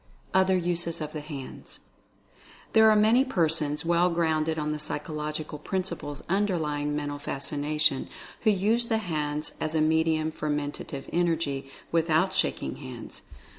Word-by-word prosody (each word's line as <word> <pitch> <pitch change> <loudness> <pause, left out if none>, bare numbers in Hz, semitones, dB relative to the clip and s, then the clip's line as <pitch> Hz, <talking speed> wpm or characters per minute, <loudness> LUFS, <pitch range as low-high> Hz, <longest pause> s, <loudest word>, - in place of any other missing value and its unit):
OTHER 190 0 +4
USES 170 -1 -1
OF 155 -1 -5
THE 155 - -4
HANDS. 145 -3 -8 0.9
There 220 0 +7
are 215 - +6
many 220 +5 +5
persons, 160 - +1
well 170 +1 +4
grounded 160 -2 +1
on 150 0 -1
the 150 - -3
psychological 150 0 -4
principles 170 -4 -3
underlying 160 -7 0
Mental 145 -1 -3
Fascina 145 +2 -3
tion, 140 -3 +2 0.3
who 220 - +4
use 215 +4 +2
the 225 - +2
hands 150 -6 -2
as 155 +1 -1
a - - +3
medium 160 0 +2
for 155 -1 -4
Mentative 145 -1 -3
Energy, 160 -6 0 0.2
without 165 +3 +2
shaking - - 0
hands. 130 -4 -9
155 Hz, 140 wpm, -27 LUFS, 150-175 Hz, 0.9 s, There